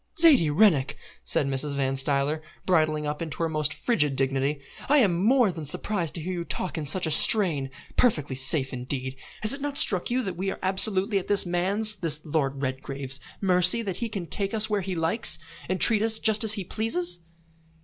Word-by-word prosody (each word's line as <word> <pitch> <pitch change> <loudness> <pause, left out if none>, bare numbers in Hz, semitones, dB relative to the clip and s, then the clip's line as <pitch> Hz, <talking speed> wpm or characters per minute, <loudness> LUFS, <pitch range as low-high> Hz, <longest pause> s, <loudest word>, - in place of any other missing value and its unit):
"Zaidie 300 - +5
Rennick!" 150 -4 +2 0.3
said - - 0
Mrs. 140 +1 -2
Van 135 -1 -1
Stuyler, 140 +3 0 0.2
bridling 155 -4 +1
up 150 +1 -4
into 160 -3 -5
her - - +1
most 155 -2 -1
frigid 150 - 0
dignity, 135 +2 -1 0.3
"I 295 - +4
am 185 -9 +2
more 245 -2 +3
than 160 -3 -8
surprised 170 +3 -2
to 170 - -3
hear 185 +4 -5
you 175 -1 -4
talk 180 - -3
in 155 -3 -4
such 180 +5 +2
a 160 - -1
strain. 155 -7 +3 0.3
Perfectly 150 - +1
safe, 130 +1 +3
indeed! 130 +1 -4 0.3
Has 215 - +4
it 280 - -8
not 285 0 -4
struck 185 -4 +2
you 250 +1 -1
that 190 -5 -5
we 190 +2 -3
are - - -5
absolutely 195 +1 0
at 185 - -10
this 205 -1 +3
man's 200 +5 0
this 160 -4 -1
Lord 140 -3 -2
Redgrave's, 135 0 -4 0.2
mercy, 185 +4 +3
that 195 -4 -5
he 235 - -4
can 195 -5 -5
take 195 +6 -1
us 220 0 +4
where 205 -1 0
he 185 0 -5
likes, 165 +8 0 0.3
and 185 0 -1
treat 220 -3 +7
us 220 0 +1
just 220 0 +2
as 220 -1 +4
he 205 -3 -2
pleases?" 180 -3 -2
175 Hz, 200 wpm, -25 LUFS, 145-210 Hz, 0.3 s, treat